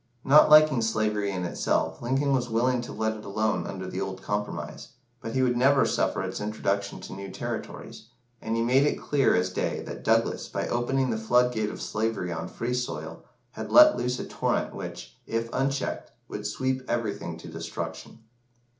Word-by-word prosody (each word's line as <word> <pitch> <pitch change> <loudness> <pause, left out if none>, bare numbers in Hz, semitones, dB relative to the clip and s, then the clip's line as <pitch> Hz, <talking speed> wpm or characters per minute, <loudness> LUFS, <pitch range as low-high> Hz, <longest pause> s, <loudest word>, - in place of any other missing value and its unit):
Not 145 +3 +7
liking 155 -4 +7
slavery 105 -2 0
in 90 -2 -3
itself, 80 -1 -1
Lincoln 135 +3 +1
was 125 -2 0
willing 120 +2 +1
to 120 - -7
let 110 0 -1
it 105 - -10
alone 100 -3 -1
under 95 -1 -5
the 95 +1 -4
old 95 -1 -5
compromise, 105 0 -4 0.3
but 115 +2 -5
he 130 - +3
would 125 -1 +2
never 135 +3 +4
suffer - - 0
its - - -4
introduction 100 -1 -2
to - - -8
new 100 0 -7
territories, - - -6 0.3
and 110 +1 -2
he 115 - +1
made 125 +3 +4
it 150 - +1
clear 140 -3 +2
as 90 0 +1
day - - -2
that - - -8
Douglas, - - +1
by - - -3
opening 130 +2 0
the 110 - -1
flood 125 +3 +3
gate 110 -2 -1
of - - -7
slavery 110 -5 -2
on 85 - -4
free 120 +2 -3
soil, 125 0 -4 0.3
had - - -7
let 305 0 +8
loose 125 0 -1
a - - -5
torrent - - -1
which, - - -8
if 115 0 -2
unchecked, 135 +1 -1 0.2
would 105 0 -5
sweep 130 +4 -1
everything 100 -8 -2
to 80 - -11
destruction. 80 +6 -7
115 Hz, 185 wpm, -27 LUFS, 100-130 Hz, 0.3 s, let